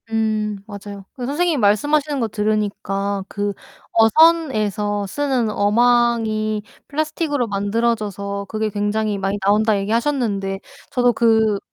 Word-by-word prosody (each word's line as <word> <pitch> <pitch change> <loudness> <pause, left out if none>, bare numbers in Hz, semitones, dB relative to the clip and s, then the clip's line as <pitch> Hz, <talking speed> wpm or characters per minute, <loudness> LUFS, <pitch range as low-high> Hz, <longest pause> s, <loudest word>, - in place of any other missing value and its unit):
음 215 -2 -1
맞아요. 200 -1 -9
그 250 - -6
선생님이 315 +4 0
말씀하시는 285 +8 +2
거 230 - 0
들으니까 200 -2 -1
그 205 0 -2 0.4
"어선에서 225 - +3
쓰는 260 -1 0
어망이 220 -1 +2 0.2
플라스틱으로 300 -3 -1
만들어져서 200 -1 -1
그게 215 0 -1
굉장히 205 0 -1
많이 195 +1 -1
나온다." 210 +1 +3
얘기하셨는데 210 -3 -1 0.3
저도 245 -1 +3
그 220 -3 +3
215 Hz, 300 characters per minute, -20 LUFS, 205-240 Hz, 0.4 s, 어선에서